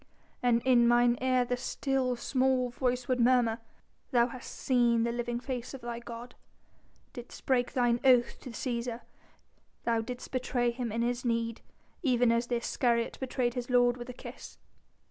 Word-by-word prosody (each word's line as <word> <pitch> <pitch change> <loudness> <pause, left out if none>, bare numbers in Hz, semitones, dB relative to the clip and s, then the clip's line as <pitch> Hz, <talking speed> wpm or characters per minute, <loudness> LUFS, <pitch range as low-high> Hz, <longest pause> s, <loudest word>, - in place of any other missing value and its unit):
"And 240 -1 +2
in 245 -2 +5
mine 240 0 +4
ear 255 -1 +2
the 245 - -1
still, 260 0 -1
small 255 0 +1
voice 250 0 -1
would 255 -1 +1
murmur: 240 -2 +3 0.5
'Thou 240 -1 +3
hast 250 +1 -9
seen 240 -3 +2
the 235 - 0
living 240 0 -2
face 250 0 -5
of 265 - -10
thy 235 0 -5
God, 235 +1 -9 0.8
didst 245 0 -10
break 245 -2 +1
thine 240 -2 +2
oath 250 -3 +4
to 255 - -9
Cæsar! 235 -1 -3 0.8
thou 230 -1 +1
didst 245 +2 -7
betray 245 -1 0
him 235 -1 -4
in 230 +2 -1
his 245 +1 -1
need, 230 -1 -1 0.4
even 245 -6 +3
as 235 +1 +1
the 245 - 0
Iscariot 235 0 0
betrayed 250 -2 -1
his 245 0 -4
Lord 245 -1 +4
with 245 0 -8
a - - -5
kiss.'" - - -10
245 Hz, 165 wpm, -30 LUFS, 235-255 Hz, 0.8 s, in